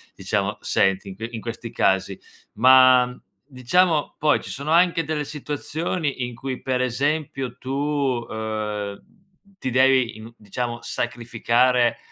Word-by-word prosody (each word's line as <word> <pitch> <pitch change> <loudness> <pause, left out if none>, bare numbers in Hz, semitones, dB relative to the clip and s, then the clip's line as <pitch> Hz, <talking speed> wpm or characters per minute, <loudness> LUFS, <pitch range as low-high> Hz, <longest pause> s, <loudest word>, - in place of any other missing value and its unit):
diciamo - - -2
senti 95 +1 +1
in 95 - -8
que 110 +4 -5
in 115 - -6
questi 115 0 -6
casi. 95 0 +1 0.3
Ma 130 -1 +6 0.3
diciamo 150 +5 +1
poi 150 0 +2
ci - - -10
sono 140 +3 -4
anche 170 0 +4
delle 150 -1 -2
situazioni 150 0 -3
in 120 - -7
cui 130 +2 -5
per 130 -1 0
esempio 135 0 -1
tu, 130 - -9
uhm, 110 -7 -2 0.6
ti 130 - -3
devi 130 -2 +3
in 110 +2 -11
diciamo 120 +3 -4
sacrificare, 120 +1 +1
125 Hz, 130 wpm, -23 LUFS, 115-140 Hz, 0.6 s, Ma